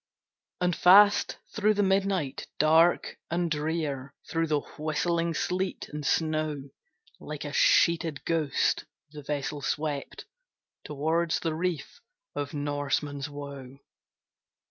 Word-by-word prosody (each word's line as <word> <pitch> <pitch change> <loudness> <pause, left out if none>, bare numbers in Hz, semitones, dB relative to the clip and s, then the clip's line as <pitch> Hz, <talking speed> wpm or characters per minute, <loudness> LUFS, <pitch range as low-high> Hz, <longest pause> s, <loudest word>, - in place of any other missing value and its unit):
And 180 -1 +2
fast 200 +3 +6 0.2
through 215 0 +2
the 205 - +2
midnight 190 -6 0
dark 160 +3 +3
and 170 0 -1
drear, 150 -3 -2
Through 165 0 0
the 150 -2 +1 0.2
whistling 165 +2 0
sleet 185 +3 -2
and 150 0 -6
snow, 155 -2 0 0.5
Like 150 0 -7
a 145 - -5
sheeted 165 -3 +3
ghost, 160 -4 +1 0.3
the 150 -1 -9
vessel 145 0 -3
swept 145 0 -3 0.6
Towards 160 +3 0
the 165 - -1
reef 165 -2 -3 0.3
of 145 -1 -3
Norman's 145 0 -2
Woe. 140 -2 -8
155 Hz, 110 wpm, -28 LUFS, 145-170 Hz, 0.6 s, fast